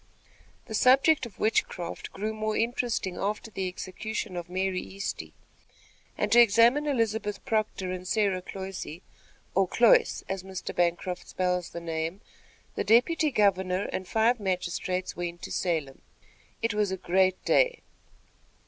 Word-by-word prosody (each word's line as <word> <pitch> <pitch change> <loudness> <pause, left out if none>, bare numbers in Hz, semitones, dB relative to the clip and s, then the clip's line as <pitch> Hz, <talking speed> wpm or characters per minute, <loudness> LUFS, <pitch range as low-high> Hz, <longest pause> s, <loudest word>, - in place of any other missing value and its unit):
The 220 - -8
subject 265 +4 +4
of 210 - -17
witchcraft 195 -5 -1
grew 215 +3 -3
more 215 0 -2
interesting 230 -5 -1
after 210 +3 -3
the 190 -2 -2
execution 190 +2 -5
of 175 -1 -5
Mary 185 0 -1
Easty, 195 +1 -5 0.9
and - - -1
to 240 - +7
examine 235 +6 +5
Elizabeth 220 -6 -1
Proctor 215 -4 -1
and 185 0 -5
Sarah 200 -3 +1
Cloyse, 190 -3 -7 0.5
or - - +3
Cloyce, - - +4
as 190 -1 -3
Mr. 190 0 -6
Bancroft 175 +1 -1
spells 180 -1 -1
the 170 - -6
name, 165 +3 -3 0.5
the - - -2
deputy 300 +8 +4
governor 190 -5 +2
and 185 - -3
five 225 +4 +2
magistrates 185 -1 -2
went 175 0 -5
to - - -6
Salem. 155 -7 -2 0.6
It 230 - +1
was 210 -1 +1
a 190 - -2
great 185 +1 +1
day. - - +3
195 Hz, 140 wpm, -28 LUFS, 180-220 Hz, 0.9 s, to